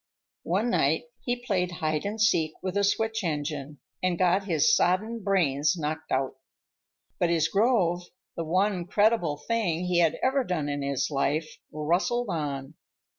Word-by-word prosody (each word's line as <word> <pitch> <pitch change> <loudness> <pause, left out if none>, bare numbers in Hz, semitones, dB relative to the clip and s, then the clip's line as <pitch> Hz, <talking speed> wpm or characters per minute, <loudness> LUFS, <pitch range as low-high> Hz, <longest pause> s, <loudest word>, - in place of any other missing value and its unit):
One 210 +7 +1
night 155 - +2 0.2
he 245 0 -3
played 180 -5 0
hide 155 -2 -2
and 215 +2 -4
seek 165 -7 +2
with 185 0 -3
a 200 - +2
switch 220 +2 0
engine 150 -3 -3 0.2
and 185 -2 0
got 185 +2 +2
his 165 -6 +3
sodden 215 +6 +1
brains 165 -5 +2
knocked 155 0 -4
out. 130 0 0 0.8
But 175 - +2
his 165 -2 +2
grove, 195 -5 +2 0.3
the 165 - -3
one 185 +2 0
creditable 205 -7 +2
thing 180 -3 -1
he 180 -1 +2
had 165 -3 +3
ever 265 +1 +2
done 165 -9 -2
in 145 0 -2
his 140 +1 -1
life, 145 +3 0 0.2
rustled 175 +10 0
on. 145 -3 -3
175 Hz, 155 wpm, -27 LUFS, 155-205 Hz, 0.8 s, his